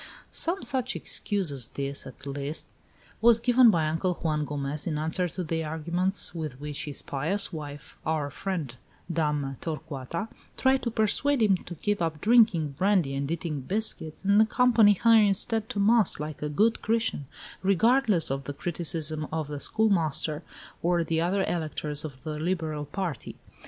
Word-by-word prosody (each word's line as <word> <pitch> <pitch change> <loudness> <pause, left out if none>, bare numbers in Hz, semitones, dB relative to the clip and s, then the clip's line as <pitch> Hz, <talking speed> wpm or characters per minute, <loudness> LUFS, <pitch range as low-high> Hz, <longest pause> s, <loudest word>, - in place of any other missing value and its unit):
Some 355 +4 +1
such 260 -2 -1
excuse 195 -7 0
as 130 -5 0
this, 140 +1 -5
at 130 +1 -13
least, 140 +2 -3 0.6
was 230 0 +6
given 245 0 +6
by 165 -6 +2
Uncle 170 +3 0
Juan 155 -3 -1
Gomez 145 +1 -4
in 155 -3 -1
answer 160 +4 0
to 180 - -5
the 160 0 -2
arguments 170 +5 0
with 155 -6 -5
which 145 -1 -5
his 145 -2 -2
pious 165 +8 -2
wife, 145 -2 -8
our 155 -2 -1
friend, 165 -11 -4 0.4
Dame 150 -4 -1
Torcuata, 160 +2 -5 0.3
tried 265 0 +3
to 235 - -1
persuade 230 +4 +1
him 200 -3 +4
to 175 - -7
give 205 -3 0
up 160 -2 -1
drinking 215 -8 +4
brandy 185 -8 +2
and 140 +1 -2
eating 160 -3 -3
biscuits, 185 -1 -2
and 200 +2 +5
accompany 225 -2 +5
her, 230 +4 +4
instead, 215 +2 +1
to 205 - -3
mass, 215 0 +4
like 150 0 -6
a 150 - -2
good 215 +10 +2
Christian, 225 - 0 0.3
regardless 200 - +3
of 135 0 -3
the 145 - -4
criticisms 155 -1 -1
of 160 -2 -3
the 145 -1 -5
schoolmaster 165 -7 +1 0.4
or 175 0 +2
the 165 0 0
other 190 +3 +1
electors 155 -4 -3
of 135 -4 -8
the 155 -1 -4
liberal 160 -3 -2
party. 175 -2 -5
165 Hz, 160 wpm, -27 LUFS, 150-205 Hz, 0.6 s, was